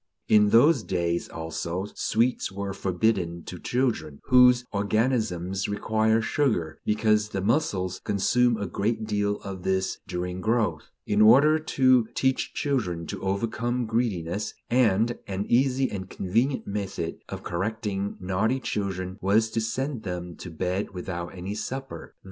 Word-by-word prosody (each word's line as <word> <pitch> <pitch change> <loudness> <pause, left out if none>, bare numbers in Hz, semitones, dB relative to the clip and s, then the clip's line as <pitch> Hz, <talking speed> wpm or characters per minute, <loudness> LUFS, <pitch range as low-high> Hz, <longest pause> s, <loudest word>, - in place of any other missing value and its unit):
In 105 -1 +5
those 130 +5 +5
days 85 -3 -1
also, 85 +3 -4
sweets 115 +1 0
were 100 0 -4
forbidden 90 -3 0
to 90 - -8
children 120 - -1
(whose 125 -1 +5
organisms 100 -3 0
require 110 +2 +1
sugar, 110 - 0
because 105 0 +2
the 100 - -3
muscles 95 - 0
consume 115 +4 +2
a 100 - -3
great 110 +4 -1
deal 105 -1 0
of 100 -3 -7
this 95 +1 -1
during 90 0 -4
growth), 110 -7 0 0.2
in 105 +1 +2
order 140 +8 +7
to 130 -6 +3
teach 130 0 +1 0.2
them 90 -9 -2
to - - -6
overcome 115 +5 -1
greediness, 105 -4 -1 0.2
and 115 -1 +3
an 100 0 -3
easy 130 +2 +2
and 95 -2 -5
convenient 120 +9 0
method 100 -4 -4
of - - -6
correcting 100 +2 -3
naughty 100 +8 0
children 95 -6 -3
was 110 +4 +2
to 115 - 0
"send 130 +3 -2
them 90 -4 -5
to 90 - -8
bed 90 +4 -3
without 85 -1 -4
any 95 +3 -5
supper." 130 -3 -6
105 Hz, 135 wpm, -26 LUFS, 95-115 Hz, 0.2 s, order